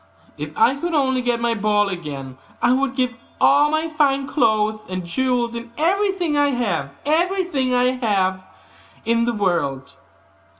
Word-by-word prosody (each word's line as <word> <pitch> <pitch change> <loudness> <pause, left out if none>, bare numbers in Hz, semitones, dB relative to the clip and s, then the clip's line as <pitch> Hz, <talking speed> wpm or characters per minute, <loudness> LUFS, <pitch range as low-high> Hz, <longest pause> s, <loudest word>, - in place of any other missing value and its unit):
if - - -6
I 445 -11 +4
could 340 +3 -2
only 260 -3 +2
get 245 -1 0
my 235 0 +1
ball 210 -1 +1
again, 145 -8 -6 0.2
I 245 - +3
would 270 0 0
give 255 -2 0 0.3
all 290 +2 +5
my 310 +1 0
fine 285 -3 +1
clothes 215 -5 +1
and 185 -1 -4
jewels, 245 +4 0
and 235 0 -7
everything 370 0 +1
that 290 0 +3
I 260 - 0 0.2
have 190 -4 0 0.6
in 230 0 +2
the 240 - 0
world. 155 -10 -1
245 Hz, 140 wpm, -21 LUFS, 205-290 Hz, 0.6 s, all